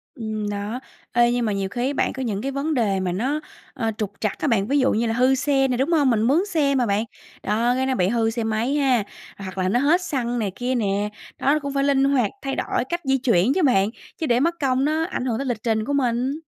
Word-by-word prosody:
Ừm, 215 -4 -4
đó, 205 +4 -4 0.3
ê, 240 0 +4
nhưng 245 -1 0
mà 215 - 0
nhiều 195 -1 -2
khi 245 +4 -2
á 280 - -1
bạn, - - 0
có 265 - -4
những 210 -5 -2
cái 270 +3 -2
vấn 280 +3 -1
đề 210 -8 +1
mà 185 -1 -1
nó, 260 +12 -1 0.3
ờ, 225 -5 -1
trục 210 -3 -2
trặc 215 -3 -2
á - - -1
bạn, 215 -5 +2
ví 285 +2 +2
dụ 265 - +3
như 230 +2 +1
là 225 - 0
hư 255 +2 +3
xe 270 0 +2
nè, 250 -2 -1
đúng 275 +6 0
hông? 295 -5 +4
Mình 225 -3 +2
mướn 290 - +3
xe 305 -8 +1
mà 250 -2 +2
bạn, 205 +1 +1 0.4
đó, 230 +4 +1
cái 260 +1 0
nó 260 -1 0
bị 180 -2 +2
hư 225 0 +1
xe 230 0 -3
máy 220 +5 0
ha, 260 -7 +2 0.3
hoặc 190 -1 -8
là 185 0 +1
nó 240 - +2
hết 310 +7 +3
xăng 245 -8 -2
này 205 -4 -1
kia 250 +1 -1
nè, 205 -2 0 0.3
đó, 280 - +3
nó 305 - +2
cũng 280 -1 -5
phải 275 0 +1
linh 275 -1 +3
hoạt 270 -6 +2
thay 270 -1 -3
đổi - - -1
cách 345 0 -2
di 270 -1 +2
chuyển 235 -2 +2
chứ 370 - +1
bạn, 205 -7 +3 0.3
chứ 325 - -2
để 240 -4 +2
mất 335 +5 +1
công 265 0 +2
nó 315 +2 +1
ảnh 295 -8 -4
hưởng 235 -3 0
tới 275 - -3
lịch 240 -5 -3
trình 220 -2 0
của 285 - -2
mình. 260 +1 0
245 Hz, 275 wpm, -23 LUFS, 220-275 Hz, 0.4 s, ê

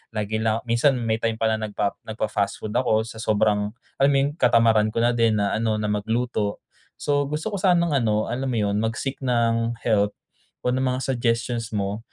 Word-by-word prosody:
lagi 110 +1 -1
lang 110 +1 0
minsan 120 +4 +2
may 115 -2 -1
time 115 -1 0
pa 110 0 +1
nagpa 105 -2 -1 0.2
nagpa-fast 105 -2 -2
food 105 - -4
ako 110 -3 +2
sa 115 -1 -9
sobrang, 105 -1 +1 0.3
alam 140 +1 +5
mo - - +3
'yun, 140 +1 +2
katamaran 110 -2 +4
ko 115 - +2
na 120 - +4
din 115 -2 +2
na 100 - 0
ano 110 -1 0
na 105 -1 -1
magluto. 110 0 -1 0.3
So, 145 -1 0
gusto 150 +8 -3
ko 200 - -2
sanang 175 -3 +3
ano, 110 -2 0
alam 130 +2 -2
mo 125 -3 -1
'yun, 100 0 0
mag-seek 115 +5 -2
ng 115 -2 +1
help 105 -3 +2 0.5
o 125 - +1
ng 130 +1 0
mga 130 - -3
suggestions 115 -1 -1
mo. 100 +1 -2
115 Hz, 195 wpm, -24 LUFS, 110-125 Hz, 0.5 s, alam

